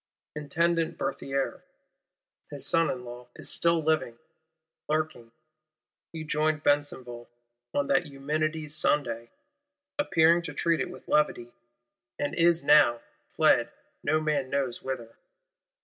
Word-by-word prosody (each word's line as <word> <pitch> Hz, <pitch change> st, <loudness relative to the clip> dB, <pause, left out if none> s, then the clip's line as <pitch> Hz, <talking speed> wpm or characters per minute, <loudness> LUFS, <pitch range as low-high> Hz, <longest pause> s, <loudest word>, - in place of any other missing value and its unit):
Intendant 165 Hz, +2 st, 0 dB
Berthier, 135 Hz, 0 st, -2 dB, 0.9 s
his -, -, -6 dB
son 165 Hz, -2 st, +3 dB
in 125 Hz, -2 st, -4 dB
law, 120 Hz, 0 st, -9 dB
is -, -, -9 dB
still 170 Hz, -1 st, +2 dB
living; 155 Hz, -7 st, 0 dB, 0.7 s
lurking: 155 Hz, -7 st, -2 dB, 0.8 s
he 160 Hz, -1 st, -6 dB
joined 155 Hz, 0 st, 0 dB
Besenval, 130 Hz, -5 st, -1 dB, 0.5 s
on 145 Hz, -, +2 dB
that 175 Hz, +3 st, +2 dB
Eumenides' 150 Hz, +2 st, -2 dB
Sunday; 135 Hz, -6 st, 0 dB, 0.7 s
appearing 170 Hz, -, +4 dB
to 170 Hz, -, -7 dB
treat 170 Hz, -2 st, +1 dB
it -, -, -2 dB
with -, -, -12 dB
levity; 135 Hz, -5 st, +1 dB, 0.7 s
and 145 Hz, -, -2 dB
is 170 Hz, -1 st, +3 dB
now 120 Hz, -6 st, +5 dB, 0.3 s
fled -, -, +4 dB, 0.3 s
no 155 Hz, -, +2 dB
man 150 Hz, -4 st, -1 dB
knows 135 Hz, -3 st, -1 dB
whither. 120 Hz, -4 st, -6 dB
150 Hz, 115 wpm, -28 LUFS, 130-160 Hz, 0.9 s, now